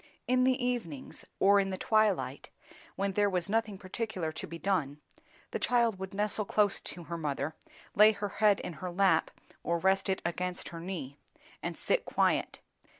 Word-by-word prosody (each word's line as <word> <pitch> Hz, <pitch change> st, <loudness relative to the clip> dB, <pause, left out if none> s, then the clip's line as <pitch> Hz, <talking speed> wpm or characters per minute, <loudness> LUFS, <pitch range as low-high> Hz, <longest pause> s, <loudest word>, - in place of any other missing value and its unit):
In 255 Hz, 0 st, +3 dB
the 255 Hz, -1 st, +2 dB
evenings, 195 Hz, -, -4 dB
or 200 Hz, +1 st, +6 dB
in 195 Hz, -1 st, 0 dB
the 190 Hz, -, -3 dB
twilight, 185 Hz, -, +1 dB, 0.5 s
when 195 Hz, 0 st, -1 dB
there 205 Hz, +1 st, +2 dB
was 180 Hz, -3 st, -1 dB
nothing 215 Hz, -1 st, 0 dB
particular 185 Hz, -3 st, -4 dB
to -, -, -6 dB
be 170 Hz, -, -7 dB
done, 165 Hz, -7 st, -1 dB, 0.5 s
the -, -, -2 dB
child 235 Hz, -5 st, +2 dB
would 190 Hz, 0 st, -5 dB
nestle 210 Hz, +1 st, +1 dB
close 205 Hz, 0 st, +2 dB
to 175 Hz, -, -6 dB
her 170 Hz, +1 st, -5 dB
mother, 145 Hz, 0 st, -2 dB, 0.4 s
lay 210 Hz, +1 st, +7 dB
her 205 Hz, -1 st, -4 dB
head 210 Hz, -2 st, +5 dB
in -, -, -5 dB
her 185 Hz, -, -3 dB
lap 180 Hz, -2 st, +3 dB, 0.3 s
or 170 Hz, -, 0 dB
rest 190 Hz, +3 st, +2 dB
it 190 Hz, -, +1 dB
against 180 Hz, +1 st, -2 dB
her 165 Hz, -, -8 dB
knee, 165 Hz, -6 st, -6 dB, 0.4 s
and -, -, -4 dB
sit -, -, +1 dB
quiet. -, -, 0 dB
195 Hz, 175 wpm, -31 LUFS, 170-210 Hz, 0.5 s, lay